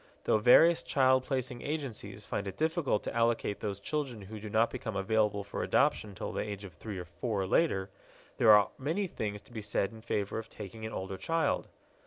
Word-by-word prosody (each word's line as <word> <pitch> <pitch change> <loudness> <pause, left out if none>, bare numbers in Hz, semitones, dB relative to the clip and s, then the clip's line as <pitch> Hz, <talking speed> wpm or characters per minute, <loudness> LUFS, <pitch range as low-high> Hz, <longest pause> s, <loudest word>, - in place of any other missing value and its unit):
Though 110 - +3
various 160 +9 +7
child 130 -1 +3
placing 130 -3 -2
agencies 145 -6 -5
find 100 - -3
it 95 - -6
difficult 160 - +1
to - - -4
allocate 115 -3 +1
those 100 -2 -3
children 130 -3 -3
who 105 +3 -8
do 105 0 -7
not 110 +2 +3
become 110 -4 -5
available 105 +1 +1
for 100 - -5
adoption 105 -2 +1
till - - -4
the - - -1
age 105 -1 -5
of 95 -4 -9
three 100 +6 -7
or 90 - -5
four 100 +5 -3
or - - -3
later, 95 - +2 0.5
there 115 - +5
are 105 -1 +6
many 160 +9 -1
things 105 - -4
to - - -17
be 110 - -4
said 100 -1 -1
in 110 -1 -12
favor 105 -2 -2
of 110 - -8
taking 110 +2 -7
an - - -7
older 95 0 -4
child. 165 +11 0
110 Hz, 210 wpm, -31 LUFS, 100-130 Hz, 0.5 s, various